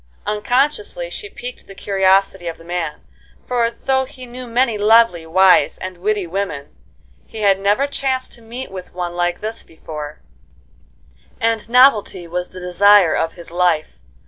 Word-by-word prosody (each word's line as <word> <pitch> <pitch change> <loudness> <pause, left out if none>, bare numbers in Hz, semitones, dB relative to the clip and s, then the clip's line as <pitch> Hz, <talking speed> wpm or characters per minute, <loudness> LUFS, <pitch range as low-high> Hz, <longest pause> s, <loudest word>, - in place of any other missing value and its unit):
Unconsciously 295 - -1
she 415 - -6
piqued 250 -7 -9
the 195 - -12
curiosity 195 -2 +1
of 165 - -4
the - - -15
man; 170 -3 -4 0.5
for, 240 -2 +1
though 265 +2 0
he 260 -1 -11
knew 250 +1 -9
many 235 0 +1
lovely, 210 -5 +4
wise, 185 +3 +4
and 185 -1 -7
witty 205 0 0
women, 170 -6 -4 0.5
he 220 - -8
had 195 -2 +3
never 205 +7 +2
chanced 265 -2 -2
to 235 - -13
meet 235 +2 -8
with 185 -2 -9
one 175 -1 -4
like 175 0 -1
this 220 +2 -5
before; 150 -2 -9 1.2
and 225 -1 -1
novelty 230 -7 +4
was 180 +1 -4
the 185 - -10
desire 180 0 +5
of 165 0 -1
his 170 -1 -12
life. 175 -3 0
200 Hz, 155 wpm, -19 LUFS, 175-240 Hz, 1.2 s, desire